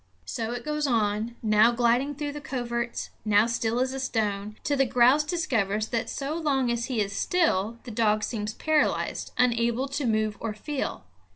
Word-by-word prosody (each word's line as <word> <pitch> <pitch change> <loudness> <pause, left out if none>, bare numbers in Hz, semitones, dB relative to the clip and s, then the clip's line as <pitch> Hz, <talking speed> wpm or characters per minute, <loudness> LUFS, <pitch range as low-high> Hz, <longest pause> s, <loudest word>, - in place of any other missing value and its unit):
So 225 - -3
it 245 0 -5
goes 300 -1 -1
on, 220 -1 0
now 215 +1 +5
gliding 245 +4 +1
through 290 0 -3
the 295 +1 -7
coverts, 235 -3 -3
now 210 0 +4
still 230 0 0
as 260 +1 0
a 270 - -4
stone, 210 -4 -2
till 290 -1 0
the 270 - +4
grouse 250 +5 +5
discovers 225 - -1
that 230 -1 -1
so 280 +2 -3
long 280 -6 +1
as 235 0 -1
he 250 -3 -2
is 200 -1 -2
still 230 - +1
the 245 - -8
dog 215 -1 +2
seems 215 -2 -3
paralyzed, 310 -1 0
unable 235 +1 +2
to 280 -1 -2
move 215 -2 0
or 220 -2 -4
feel. 275 - -4
235 Hz, 180 wpm, -27 LUFS, 215-270 Hz, -, now